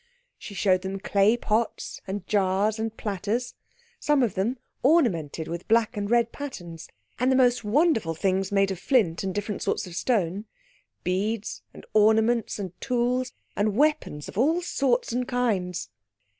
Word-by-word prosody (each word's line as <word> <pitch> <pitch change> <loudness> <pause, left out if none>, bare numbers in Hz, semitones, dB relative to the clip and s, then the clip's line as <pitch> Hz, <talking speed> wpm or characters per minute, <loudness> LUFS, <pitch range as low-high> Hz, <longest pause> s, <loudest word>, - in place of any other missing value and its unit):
She 200 - -9
showed 185 -2 +2
them 190 0 -4
the 195 - -4
clay 205 +3 +3
pots 225 -1 -2
and 195 -1 -4
jars 205 +2 +1
and 225 0 -3
platters, 210 +4 -2 0.5
some 295 -3 +3
of 225 -6 0
them 225 +8 -1 0.2
ornamented 190 - +2
with 170 +1 -6
black 225 0 +3
and 205 -1 -3
red 235 0 +3
patterns, 175 - -8 0.3
and 255 +2 +3
the - - +4
most 245 -2 +3
wonderful 225 - +2
things 190 +2 0
made 195 -1 +2
of 190 - -4
flint 195 - +2
and 190 - -1
different 205 +1 -3
sorts - - -1
of 175 -2 -9
stone, 200 -3 0 0.6
beads, 205 +4 -2
and - - -13
ornaments, 220 +2 +3
and 195 -4 -5
tools 250 0 0 0.2
and 205 0 +1
weapons 295 - +1
of - - -5
all 320 +7 +2
sorts 260 -8 0
and 250 0 -1
kinds. 205 -9 -1
215 Hz, 160 wpm, -26 LUFS, 190-245 Hz, 0.6 s, the